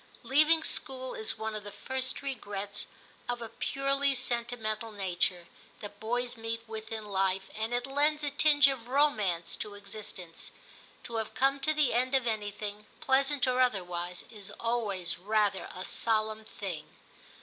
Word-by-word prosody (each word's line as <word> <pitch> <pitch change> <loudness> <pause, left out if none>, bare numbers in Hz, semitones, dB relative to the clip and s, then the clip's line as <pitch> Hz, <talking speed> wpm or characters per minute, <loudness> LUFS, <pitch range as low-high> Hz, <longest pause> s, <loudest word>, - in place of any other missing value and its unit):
Leaving 310 +4 +5
school 260 -3 -2
is 220 - -1
one 220 0 -3
of 215 -1 -5
the 205 - -7
first 260 +5 -2
regrets 205 -6 -3 0.4
of 245 0 0
a 230 -1 -6
purely 275 +3 +1
sentimental 235 -3 0
nature, 185 -3 0 0.3
that 205 - -8
boys 245 +2 -1
meet 225 0 -4
with 220 0 -7
in 220 -1 -3
life, 195 -1 0
and 220 +2 -2
it 245 0 0
lends 295 +2 +2
a 290 - 0
tinge 290 0 +6
of 260 -4 -1
romance 215 - +2
to 205 -1 -5
existence. 200 -4 -7 0.5
To 230 - -4
have 220 - -3
come 275 +1 +3
to 275 +3 +2
the 300 -4 +3
end 255 +3 +2
of 260 -2 +3
anything, 210 -1 -3
pleasant 270 0 +3
or 255 0 +3
otherwise, 180 -6 0
is 210 -3 -9
always 200 -8 -1
rather 205 0 +1
a 185 - -5
solemn 220 -1 +1
thing. 185 -8 -6
225 Hz, 155 wpm, -31 LUFS, 205-260 Hz, 0.5 s, tinge